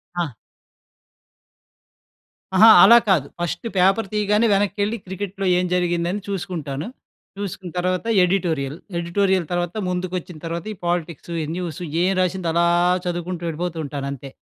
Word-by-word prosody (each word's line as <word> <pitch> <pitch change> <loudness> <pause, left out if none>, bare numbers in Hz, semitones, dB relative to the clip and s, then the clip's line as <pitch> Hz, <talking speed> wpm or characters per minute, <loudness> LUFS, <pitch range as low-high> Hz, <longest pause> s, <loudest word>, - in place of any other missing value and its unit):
ఆ! 175 -1 0 2.3
అహా! 215 +4 +8 0.2
అలా 235 - +9
కాదు, 170 -9 +3
ఫస్టు 175 +5 -3
పేపర్ 195 +4 +3
తీయగానే 210 +2 +2
వెనక్కెళ్ళి 205 +2 0
క్రికెట్‌లో 195 +1 -5
ఏం 180 - +1
జరిగిందని 175 +2 0
చూసుకుంటాను. 160 -7 -4 0.5
చూసుకున్న 190 -3 -6
తర్వాత 185 +2 -1 0.2
ఎడిటోరియల్. 165 -6 0 0.2
ఎడిటోరియల్ 185 +1 +1
తర్వాత 175 -1 -2
ముందుకు 180 0 -3
వచ్చిన 175 -1 -8
తర్వాత 165 0 -4
ఈ - - -12
పాలిటిక్సు, 170 -1 -3
ఈ - - -2
న్యూసు 180 0 -5 0.2
ఏం 185 +2 +3
రాసిందో 185 -1 0
అలా 170 +1 +3 0.4
చదువుకుంటూ 175 0 -3
వెళ్ళిపోతూ 165 +1 -3
ఉంటానంతే. 140 -1 -5
180 Hz, 125 wpm, -22 LUFS, 170-195 Hz, 2.3 s, అలా